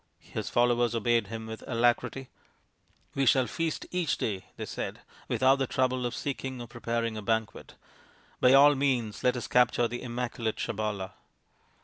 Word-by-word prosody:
His - - -6
followers 120 -1 +2
obeyed 115 -1 +2
him 110 +1 -6
with 110 0 -8
alacrity. 120 +2 +1 0.4
" - - -39
We 135 -1 +1
shall 130 +1 +5
feast 160 +7 -3
each 175 -7 0
day," 95 -4 -3
they - - -4
said, - - -5
" - - -24
without 130 +1 +3
the 135 -1 -1
trouble 130 -1 0
of 120 - -5
seeking 130 -2 -4
or 120 - -6
preparing 115 -1 -3
a - - -4
banquet. 110 0 -2 0.6
By 125 - +5
all 145 +2 +8
means 125 -7 -1
let 125 0 +3
us 120 - -4
capture 125 0 +3
the 120 +1 -5
immaculate 120 -2 -3
Sabala." 105 -2 -3
120 Hz, 165 wpm, -29 LUFS, 115-130 Hz, 0.6 s, all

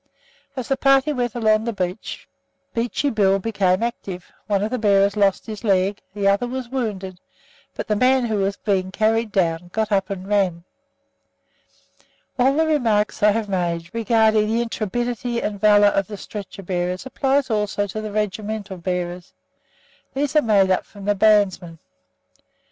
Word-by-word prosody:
As 255 -3 -4
the 270 - 0
party 275 +2 +3
went 245 -4 -2
along 220 -2 +2
the 235 - -1
beach, 185 0 -5 0.5
Beachy 245 +4 -1
Bill 195 -3 +3
became 195 -1 0
active; 190 -6 -5 0.2
one 200 -1 +1
of 215 - -2
the 255 - -1
bearers 200 -1 +3
lost 200 -2 +2
his 215 -2 -7
leg, 195 -1 +1
the 200 -1 0
other 200 +5 +2
was 255 -1 -5
wounded, 200 -8 -4 0.6
but - - -4
the 210 - +1
man 255 +3 +3
who 220 -2 -1
was 200 0 -1
being 190 -3 -1
carried 220 +2 +1
down 175 -2 0
got 220 +1 -1
up 195 -2 +1
and 190 -1 -5
ran! 190 -5 +1 1.8
All 265 +2 +4
the 320 +1 +3
remarks 230 -9 +1
I 210 - +6
have 215 0 0
made 175 -3 -2
regarding 220 -1 +3
the 230 +2 +1
intrepidity 235 +2 -2
and 205 -3 -4
valour 205 -1 +6
of 195 -2 0
the 205 - -7
stretcher 195 0 -8
bearers 180 +2 -2
apply 270 +1 +1
also 210 -3 -1
to 210 +2 -5
the 215 -1 -5
regimental 210 -1 -3
bearers. 180 0 -4 0.8
These 285 +2 -1
are 305 - +6
made 200 -6 +3
up 185 - +2
from 200 -2 -12
the 205 - +3
bandsmen. 195 -5 +2
210 Hz, 165 wpm, -22 LUFS, 195-230 Hz, 1.8 s, I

